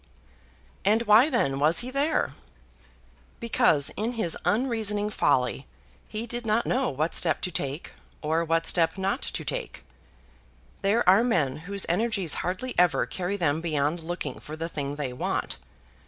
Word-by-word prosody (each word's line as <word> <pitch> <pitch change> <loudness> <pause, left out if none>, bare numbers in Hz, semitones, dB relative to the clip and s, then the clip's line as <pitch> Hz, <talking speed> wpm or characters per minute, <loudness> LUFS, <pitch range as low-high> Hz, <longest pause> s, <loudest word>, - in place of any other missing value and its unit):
And 215 +4 +3
why 225 +6 +6
then 140 - +1
was 155 +7 +3
he 255 - -5
there? 280 - +1 1.1
Because 155 -10 +2
in 225 +3 -3
his 220 -8 0
unreasoning 215 -3 0
folly 130 -5 +1 0.4
he 220 +1 -3
did 240 +1 -5
not 225 +1 +1
know 260 +1 +1
what 155 +5 -1
step 160 -4 +1
to 180 - -2
take, 140 0 -4 0.3
or 160 +2 +1
what 165 0 +1
step 165 +2 +1
not 195 +7 -1
to - - -4
take. - - -5 1.0
There 205 +3 +2
are 195 +5 +7
men 155 - +1
whose 200 -1 0
energies 195 -3 0
hardly 190 +8 -3
ever 175 -2 +4
carry 185 +2 -3
them 160 -3 +1
beyond 155 0 0
looking 175 +2 -5
for 155 - -8
the 165 +1 -4
thing 145 -3 -4
they 140 -4 -4
want. 125 - -2
180 Hz, 155 wpm, -27 LUFS, 155-225 Hz, 1.1 s, are